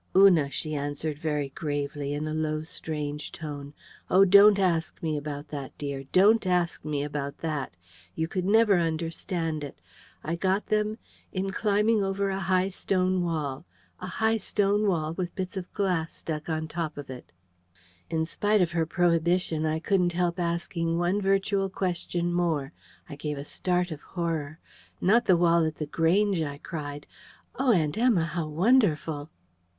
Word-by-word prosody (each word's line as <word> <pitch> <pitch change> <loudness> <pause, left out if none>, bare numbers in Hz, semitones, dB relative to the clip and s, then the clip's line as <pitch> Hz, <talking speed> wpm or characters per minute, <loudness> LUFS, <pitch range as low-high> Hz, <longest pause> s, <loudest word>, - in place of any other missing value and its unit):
"Una," 180 -7 +6
she 155 +2 -3
answered 145 +1 -3
very 150 -3 -1
gravely, 145 0 -3
in 150 +1 -3
a 155 - -3
low 155 0 -1
strange 150 -2 -5
tone, 145 -3 -7 0.4
"oh, 190 +2 +6
don't 200 +2 +7
ask 175 -4 0
me 155 -2 0
about 145 0 -5
that, 140 -3 -7
dear. 140 -2 -4
Don't 205 +2 +5
ask 175 -2 0
me 145 -1 -2
about 145 -1 -4
that. 145 - -3 0.4
You 160 - -1
could 185 +2 -2
never 210 -2 +5
understand 165 -1 -2
it.... 140 - -8 0.4
I 165 +3 -2
got 190 +3 +1
them... 215 0 +1 0.3
in 195 +1 -2
climbing 210 +1 +2
over 195 0 0
a 190 - -2
high 185 0 +1
stone 185 -1 0
wall... 155 -3 -3 0.3
a 185 - -6
high 220 +5 +1
stone 205 0 +1
wall, 160 -4 0
with 180 0 -4
bits 185 -1 -4
of 185 -2 -5
glass 180 -6 -1
stuck 155 0 -5
on 160 0 -2
top 160 -2 -4
of 145 -2 -7
it." 125 -1 -10 0.8
In 160 0 0
spite 205 +4 +2
of 170 - -1
her 165 -1 0
prohibition, 170 -1 +1
I 155 0 0
couldn't 175 +1 +1
help 175 0 0
asking 170 -1 -1
one 175 +4 +1
virtual 195 0 +1
question 175 -2 -2
more. 165 -4 0 0.3
I 145 - -8
gave 150 0 -4
a 140 - -6
start 180 +2 -1
of 150 -2 -6
horror: 160 -4 -3 0.4
"Not 225 +6 +3
the 185 - +6
wall 170 -1 +4
at 155 -1 -1
The 150 - -4
Grange!" 175 +5 +2
I 145 -2 -3
cried. 145 -2 -6 0.5
"Oh, 265 -1 +2
Aunt 165 -1 +1
Emma, 230 -9 +3
how 165 -1 -3
wonderful!" 160 - +2
170 Hz, 165 wpm, -27 LUFS, 155-190 Hz, 0.8 s, don't